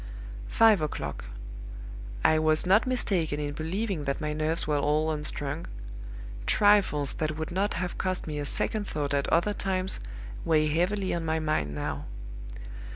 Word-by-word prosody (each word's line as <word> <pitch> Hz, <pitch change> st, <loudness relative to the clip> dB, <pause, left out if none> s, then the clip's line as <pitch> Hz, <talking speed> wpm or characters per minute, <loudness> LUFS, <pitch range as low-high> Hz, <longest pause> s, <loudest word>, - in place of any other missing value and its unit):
"Five 220 Hz, -6 st, +5 dB
o'clock. 75 Hz, -, -4 dB, 1.0 s
I 155 Hz, -, +5 dB
was 155 Hz, +1 st, +3 dB
not 195 Hz, +7 st, +4 dB
mistaken 180 Hz, -12 st, 0 dB
in 145 Hz, -1 st, -3 dB
believing 170 Hz, +1 st, -2 dB
that 140 Hz, 0 st, -1 dB
my 150 Hz, -1 st, -2 dB
nerves 155 Hz, +2 st, 0 dB
were 150 Hz, -1 st, +1 dB
all 150 Hz, +2 st, +1 dB
unstrung. 150 Hz, 0 st, -3 dB, 0.8 s
Trifles 200 Hz, -9 st, +3 dB
that 155 Hz, -1 st, -2 dB
would 160 Hz, +1 st, -4 dB
not 195 Hz, +4 st, 0 dB
have 180 Hz, 0 st, -3 dB
cost 185 Hz, -1 st, -1 dB
me 150 Hz, -2 st, -4 dB
a 145 Hz, -, -3 dB
second 210 Hz, +5 st, -1 dB
thought 145 Hz, -1 st, -2 dB
at 140 Hz, -1 st, +1 dB
other 175 Hz, +5 st, +2 dB
times 190 Hz, -1 st, 0 dB, 0.4 s
weigh 155 Hz, -1 st, +3 dB
heavily 185 Hz, +5 st, 0 dB
on 170 Hz, -, -2 dB
my 160 Hz, 0 st, 0 dB
mind 115 Hz, -, -1 dB
now. 75 Hz, -, -3 dB
160 Hz, 155 wpm, -28 LUFS, 150-185 Hz, 1.0 s, Five